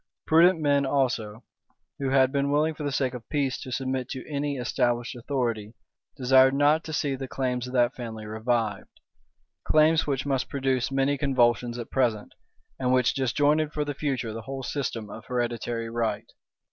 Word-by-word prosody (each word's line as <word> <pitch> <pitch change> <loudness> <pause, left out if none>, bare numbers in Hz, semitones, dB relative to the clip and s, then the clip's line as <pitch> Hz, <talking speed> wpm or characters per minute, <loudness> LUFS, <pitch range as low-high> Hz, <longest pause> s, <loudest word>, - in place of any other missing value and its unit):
Prudent 170 +2 +5
men 145 -2 +2
also, 125 -5 -1 0.6
who 135 -1 -1
had 130 -1 +4
been 140 0 0
willing 150 +2 +2
for 155 - -10
the 145 -1 -2
sake 135 -2 0
of 125 -2 -9
peace 140 -4 -1
to 130 - -7
submit 130 -1 -2
to 130 - -6
any 145 -1 -2
established 120 -1 0
authority, 115 -4 -3 0.4
desired 130 0 +5
not 145 +3 +3
to 160 - -6
see 145 -2 -1
the 135 0 -6
claims 125 -2 -2
of 125 - -8
that 120 0 +3
family 110 -3 -7
revived; 110 0 -2 0.6
claims 155 +1 +3
which 140 -1 -1
must 135 -2 -1
produce 135 -2 0
many 135 +1 +1
convulsions 120 -3 +2
at 120 - -7
present, 115 -5 0 0.5
and 125 -1 +1
which 125 -1 +3
disjointed 145 +4 +1
for 150 -1 -1
the 145 - -3
future 130 -6 -2
the 115 - -6
whole 135 +2 -6
system 120 -5 -3
of 115 - -9
hereditary 120 -1 -2
right. 115 -1 -2
130 Hz, 170 wpm, -26 LUFS, 120-140 Hz, 0.6 s, Prudent